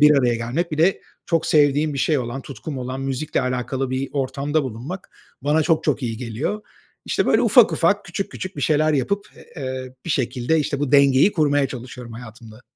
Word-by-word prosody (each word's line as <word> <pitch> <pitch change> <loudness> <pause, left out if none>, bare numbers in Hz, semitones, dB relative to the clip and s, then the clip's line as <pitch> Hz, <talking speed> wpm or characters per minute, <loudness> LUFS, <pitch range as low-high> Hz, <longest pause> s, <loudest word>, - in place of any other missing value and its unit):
bir 150 0 +8
araya 120 -3 +2
gelmek, 135 +9 -2
bir 155 - -3
de 175 +5 +3 0.3
çok 165 -2 +1
sevdiğim 150 0 +3
bir 140 - -3
şey 150 +3 +2
olan, 125 +2 -4
tutkum 140 +1 -7
olan, 130 +1 -4
müzikle 135 +2 -1
alakalı 125 +1 -2
bir 130 +1 -2
ortamda 140 +2 -1
bulunmak 130 - -6 0.3
bana 150 +3 +2
çok 160 +1 +1
çok 145 -2 0
iyi 115 -2 -2
geliyor. 125 - -3 0.4
İşte, - - 0
böyle - - +4
ufak - - +6
ufak, - - +2
küçük 195 - -4
küçük 185 0 -6
bir 145 - -4
şeyler 155 +3 +3
yapıp, 175 +9 0 0.3
eee, 130 -2 -5
bir 170 - -4
şekilde, 125 +4 0
işte, 140 -1 -1
bu 145 -2 -1
dengeyi 140 +6 +5
kurmaya 145 -3 +2
çalışıyorum 125 -1 -8
hayatımda. 115 0 -11
135 Hz, 190 wpm, -22 LUFS, 125-155 Hz, 0.4 s, bir